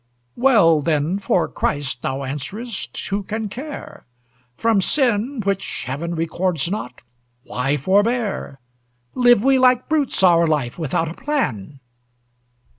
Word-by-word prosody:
"Well, 210 - +4
then, 160 +4 0
for 185 -3 +1
Christ," 140 -4 -2
thou 135 +1 -3
answerest, 195 - -6
"who 200 +1 -1
can 215 +2 -4
care? 275 - -8 0.5
From 225 -3 +2
sin, 245 +1 +1
which 195 -1 -2
Heaven 165 +6 -4
records 165 0 -1
not, 125 -12 -5 0.4
why 135 +2 -1
forbear? 205 - 0 0.5
Live 245 -4 +4
we 270 0 +4
like 255 -1 +4
brutes 295 -9 +1
our 170 -2 +5
life 150 -3 -1
without 165 +1 -1
a 160 - -5
plan!" 140 - -3
190 Hz, 120 wpm, -21 LUFS, 150-235 Hz, 0.5 s, our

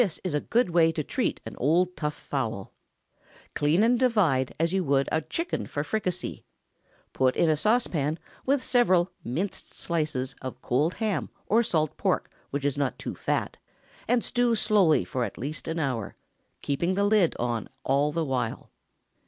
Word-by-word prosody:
This 195 -9 0
is 185 - -2
a 150 - +2
good 235 -6 +1
way 165 -1 +5
to 155 - -2
treat - - -1
an - - -7
old 175 +7 +2
tough 150 -1 -2
fowl. 115 -8 -4 0.8
Clean 155 +7 +3
and 240 +1 +3
divide, 185 - +2
as 165 +2 +1
you 190 -1 +2
would 140 -2 +2
a 160 - +2
chicken 330 - -3
for 145 - -2
fricassee. 185 -1 -3 0.7
Put 130 -1 +2
in 165 - +3
a - - +3
saucepan, 160 - +1 0.3
with 270 0 +1
several 185 -8 +3
(minced) 170 +12 -4
slices 150 -6 -1
of 130 -1 -6
cold 150 +8 +1
ham 210 -8 -1 0.2
or 225 +3 +4
salt 155 -9 0
pork - - 0 0.2
which 140 0 -3
is 145 0 0
not 135 -5 0
too - - -5
fat, - - -2 0.5
and 240 0 +2
stew 245 -1 +2
slowly 210 -7 +3
for 130 -3 -2
at - - -5
least 150 +5 -5
an 160 +1 -2
hour—keeping 140 - -3
the 200 - +2
lid 205 -5 +3
on 120 -2 -2
all 140 +2 +2
the 165 +1 -1
while. 125 -4 -2
160 Hz, 170 wpm, -27 LUFS, 140-200 Hz, 0.8 s, way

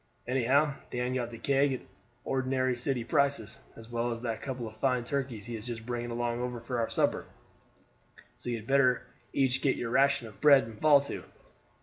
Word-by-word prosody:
Anyhow, 135 +4 +3 0.2
Dan 125 +1 -2
got 125 -2 -1
the 115 - -9
keg 140 +3 +2
at 130 - -4 0.4
ordinary 130 -1 0
city 125 0 -1
prices, 140 -3 0 0.2
as 115 - -12
well 120 0 -1
as 115 +1 -5
that 115 -2 -2
couple 125 -4 -4
of 110 - -10
fine 125 +1 +1
turkeys 125 -5 -3
he 120 0 -5
is 110 +1 -7
just 115 -2 -5
bringing 120 0 -3
along 120 +1 -2
for 120 0 -3
our 115 - 0
supper. - - 0 1.1
So - - -6
you 120 - 0
had 110 -2 -7
better 130 -1 +3 0.3
each 130 -1 +1
get 135 - +2
your 115 - -3
ration 135 -2 +3
of 110 - -15
bread 140 -3 +7
and 110 -1 -10
fall 150 -2 +6
to." 140 - -6
125 Hz, 195 wpm, -30 LUFS, 115-135 Hz, 1.1 s, bread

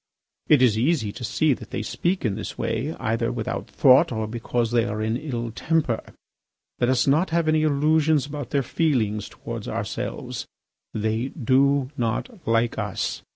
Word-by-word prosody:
It 145 -4 +5
is 110 -3 +4
easy 130 -5 +1
to 120 - -9
see 140 +5 +2
that - - -9
they - - -3
speak 180 -3 -1
in 105 - +1
this 110 - -6
way 115 +7 -2
either 115 0 0
without 120 -3 -4
thought 130 -1 +5
or 110 -2 -2
because 115 +1 -2
they 120 -1 +3
are 105 +1 -3
in 110 +1 0
an - - -4
ill 120 -6 -3
temper. 150 -2 0 0.8
Let 120 - +2
us 130 -1 +3
not 155 +7 +3
have 165 0 +1
any 155 0 +3
illusions 155 0 +3
about 145 -4 -6
their 140 -1 +1
feelings 115 -10 0
towards - - -7
ourselves. - - -4 0.4
They 110 +3 -1
do 135 0 +2
not 145 - -3
like 115 0 +1
us. 105 -3 -2
125 Hz, 170 wpm, -24 LUFS, 115-150 Hz, 0.8 s, It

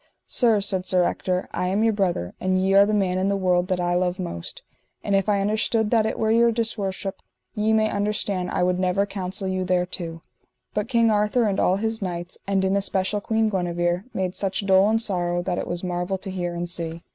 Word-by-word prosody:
Sir, 225 -5 +2
said 190 -2 0
Sir 180 -1 +3
Ector, 180 +1 -1
I 180 - -1
am 200 +4 +1
your 225 -1 +3
brother, 180 - -1
and 185 0 +1
ye 190 +1 +2
are 200 +1 +6
the - - 0
man 185 -2 +1
in 190 - +1
the 200 - +1
world 180 -2 +1
that 185 -1 -1
I 175 0 0
love 180 0 0
most; 130 - -6 0.4
and 200 - +1
if 195 +1 +1
I 200 -1 +2
understood 215 +1 +1
that 225 -2 +3
it - - -3
were 220 0 +1
your 235 +1 +4
disworship, 205 -4 -2 0.3
ye 215 +1 +1
may 220 0 +3
understand 200 -3 -1
I - - 0
would 180 0 +1
never 185 +2 +1
counsel 195 0 -4
you 185 0 -1
thereto; 180 -2 -2 0.5
but 210 - -1
King 230 -3 +3
Arthur 210 +3 +2
and 200 -3 0
all 185 - +3
his 220 +2 -2
knights, 175 -2 -5
and 195 -1 +1
in 190 +1 +1
especial 200 +1 0
Queen 220 +1 +1
Guenever, 175 -1 -1
made 185 -1 -2
such 195 +1 -2
dole 190 +1 +5
and 225 +1 +2
sorrow 175 -5 -1
that 175 -1 -2
it - - -4
was 175 +1 -3
marvel 180 +1 -2
to 190 +1 -6
hear 175 -2 -3
and 175 0 -3
see. 170 -1 -4
190 Hz, 220 wpm, -24 LUFS, 180-210 Hz, 0.5 s, are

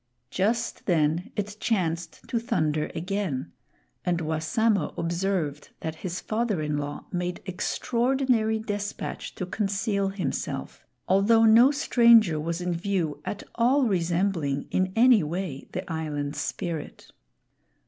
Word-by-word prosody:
Just 230 +5 -1
then 165 0 +2
it 205 0 -3
chanced 175 -6 -2
to 235 - 0
thunder 155 - 0
again, 170 - -2 0.5
and 175 -1 0
Wassamo 160 +4 0
observed 170 -4 -1
that 160 0 -4
his 180 +1 -4
father 220 -4 -1
in 150 -1 -1
law 145 0 -5
made, 180 -1 -2
extraordinary 235 +3 +1
despatch 205 -2 -4
to 185 - -3
conceal 200 +1 -1
himself, 185 -8 -4 0.2
although 215 +4 +5
no 230 +4 +7
stranger 235 - +5
was 165 +3 -3
in 180 0 -1
view, 170 -5 -1
at 205 - -4
all 255 +4 +3
resembling 170 - 0
in 185 0 +1
any 240 -1 +6
way 160 -2 -4
the - - -5
Island 150 -2 -3
Spirit. 155 +2 -5
185 Hz, 120 wpm, -26 LUFS, 160-220 Hz, 0.5 s, no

